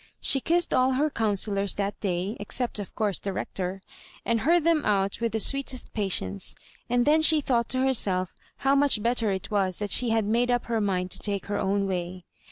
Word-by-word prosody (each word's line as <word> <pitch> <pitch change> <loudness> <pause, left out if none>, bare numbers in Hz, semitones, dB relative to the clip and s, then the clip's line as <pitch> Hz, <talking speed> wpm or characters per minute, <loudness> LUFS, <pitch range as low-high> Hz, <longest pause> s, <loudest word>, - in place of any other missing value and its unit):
She 275 - +3
kissed 340 +5 +1
all 255 +1 +3
her 295 +4 +1
counsel 210 -3 0
lors 200 0 0
that 200 0 -3
day 190 +2 -2
(except, 235 +2 -2
of 200 - -8
course, 205 -4 -1
the 200 - -4
Rector), 190 0 -4 0.4
and 230 -1 +1
heard 335 +6 +3
them 325 -2 +2
out 195 0 0
with 230 -1 0
the 220 - -1
sweetest 265 +1 +1
patience; 135 - -2 0.3
and 245 0 +2
then 310 +2 +4
she 315 0 +5
thought 240 -5 0
to 260 +1 +1
berself 190 -8 +1 0.3
how 270 - +4
much 280 -6 +3
better 235 -2 +1
it 190 +2 -4
was 190 -3 0
that 205 -2 -4
she 245 - +3
had 225 -1 +1
made 235 +4 +1
up 245 0 +1
her 230 -2 -1
mind 185 -3 -1
to - - -2
take 200 -2 -1
her 205 0 -2
own 200 +1 0
way. 180 -1 -4
215 Hz, 210 wpm, -26 LUFS, 195-255 Hz, 0.4 s, she